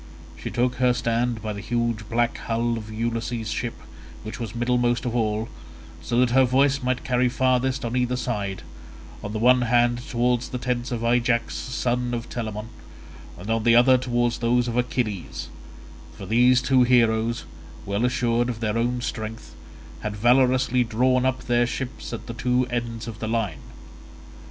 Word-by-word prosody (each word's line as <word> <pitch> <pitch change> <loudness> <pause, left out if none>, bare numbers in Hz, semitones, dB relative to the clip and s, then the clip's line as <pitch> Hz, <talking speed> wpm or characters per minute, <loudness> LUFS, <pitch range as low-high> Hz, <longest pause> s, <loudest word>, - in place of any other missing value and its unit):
She - - -6
took 125 +1 0
her 125 0 +3
stand 120 -1 -1
by 110 -1 -3
the 100 - -6
huge 115 -1 -2
black 120 +1 +1
hull 115 +1 -1
of 110 -1 -7
Ulysses' 115 0 -3
ship 120 -2 -3 0.5
which 110 +2 -7
was 115 -2 -5
middlemost 120 0 +1
of 120 -1 -2
all, 110 -1 0 0.5
so 120 - -2
that 125 -2 +2
her 130 +2 +5
voice 135 +2 +2
might 125 -1 -1
carry 125 -1 +2
farthest 130 0 +1
on 115 +1 -3
either 125 0 +1
side, 105 -7 -3 0.6
on 105 - -4
the 110 - -3
one 125 +3 +5
hand 120 0 +2
towards 125 0 0
the 125 - -4
tents 125 0 -2
of 120 -1 -3
Ajax 115 0 +1
son 125 -1 -2
of 115 0 -6
Telamon, 110 -2 -4 0.7
and 100 +5 -5
on 115 0 +1
the 115 0 +5
other 125 +2 +6
towards 120 -2 0
those 120 +1 +2
of 120 - -3
Achilles—for 120 -6 -5
these 125 +2 +4
two 130 -2 +4
heroes, 115 -2 +2 0.4
well 100 +3 -1
assured 120 -1 +1
of 115 -2 -4
their 110 0 -1
own 120 +1 0
strength, 110 -1 -5 0.5
had 105 0 -4
valorously 125 +2 +3
drawn 125 +3 +2
up 130 0 -2
their 120 0 +2
ships 130 +1 -5
at - - -6
the 115 - -6
two 125 +2 +1
ends 115 -1 -3
of 110 -2 -7
the 110 - -3
line. 110 -9 -1
120 Hz, 170 wpm, -24 LUFS, 115-125 Hz, 0.7 s, other